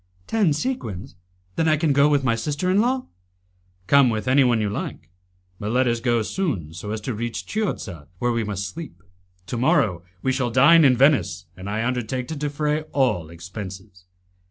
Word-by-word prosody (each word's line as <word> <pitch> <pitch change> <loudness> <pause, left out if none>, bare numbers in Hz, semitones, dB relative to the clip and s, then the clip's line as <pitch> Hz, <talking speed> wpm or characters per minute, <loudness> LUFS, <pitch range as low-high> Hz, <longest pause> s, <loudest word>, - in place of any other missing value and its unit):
"Ten 210 -7 +2
sequins! 140 - -3 0.4
Then 165 - +2
I 155 -1 +4
can 155 -2 +2
go 140 +2 +5
with 145 -2 +2
my 125 -3 +2
sister 145 +10 -1
in 200 +2 +4
law?" 255 +2 0 0.8
"Come 140 +4 +5
with 110 +1 -2
anyone 130 -3 +4
you 105 - 0
like, 85 -4 -5 0.5
but 105 - -3
let 125 +2 +2
us 120 -1 +1
go 120 -1 +1
soon 105 - -3
so 85 +5 -7
as 110 +1 -2
to 120 +4 -3
reach 115 +2 -4
Chiozza, 105 - -3
where 120 +5 0
we 115 -1 0
must 100 -2 -3
sleep. 95 - -9 0.4
To 120 - -4
morrow 115 - +2 0.2
we 130 - +2
shall 130 -2 0
dine 150 +8 +6
in 130 -3 +5
Venice, 135 - +3
and 95 +2 -7
I 110 +2 -1
undertake 125 0 -2
to 160 - -3
defray 150 +1 -1
all 120 - +1
expenses." 95 +2 -9
125 Hz, 180 wpm, -23 LUFS, 105-145 Hz, 0.8 s, dine